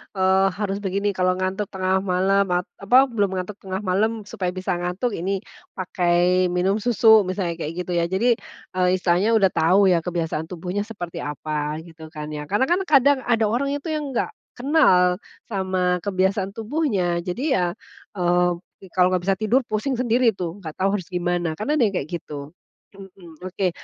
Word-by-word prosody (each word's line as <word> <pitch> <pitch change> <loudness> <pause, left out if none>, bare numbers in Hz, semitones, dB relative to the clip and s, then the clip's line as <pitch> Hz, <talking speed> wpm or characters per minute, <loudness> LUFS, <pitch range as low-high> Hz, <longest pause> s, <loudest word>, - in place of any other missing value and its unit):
eee, 190 0 +3
harus 200 0 -2
begini, 200 +1 -1
kalau 185 -1 +1
ngantuk 190 +2 -2
tengah 190 0 0
malam, 195 +1 +2
apa 200 +6 +1
belum 200 -4 0
ngantuk 185 +3 -5
tengah 190 +1 -5
malam 215 +4 0
supaya 190 -2 -4
bisa 185 0 -3
ngantuk 180 +8 -2
ini 195 +1 -2 0.3
pakai 180 0 +2
minum 180 +4 +1
susu 220 -3 +5
misalnya 180 -3 -2
kayak 155 +1 -4
gitu 180 - -6
ya. 170 - +1
Jadi, 195 +7 +2 0.5
eee, 180 - +4
istilahnya 185 +5 +2
udah 195 -4 +4
tahu 190 +4 +4
ya 175 - +4
kebiasaan 165 -2 -3
tubuhnya 185 +4 -4
seperti 175 -6 -6
apa 150 0 -3
gitu 160 -1 -12
kan 150 -1 -7
ya. 150 -1 -6
Karena 205 - +1
kan 355 - +3
kadang 280 -1 +5
ada 230 -2 +2
orang 275 +5 0
itu 290 +3 -5
yang 300 -3 -3
nggak - - 0 0.2
kenal 195 - +3 0.3
sama 185 -2 0
kebiasaan 190 0 0
tubuhnya, 215 - 0
jadi 180 +10 -4
ya, 185 - +2 0.5
eee, 180 0 +2 0.5
kalau 180 -1 +5
nggak 180 -1 0
bisa 195 - +3
tidur, 220 +6 +2
pusing 215 +6 -1
sendiri 240 -1 +3
tuh 180 -2 -5
nggak 155 -2 -6
tahu 195 +2 +2
harus 185 -1 -5
gimana 175 -2 -1
kan 215 - -3
ada 300 - +2
yang 200 - -1
kayak 150 -4 -3
gitu, 150 -4 -6 0.5
mhm. 185 -4 -13
Oke, 185 0 -1
185 Hz, 175 wpm, -23 LUFS, 180-210 Hz, 0.5 s, susu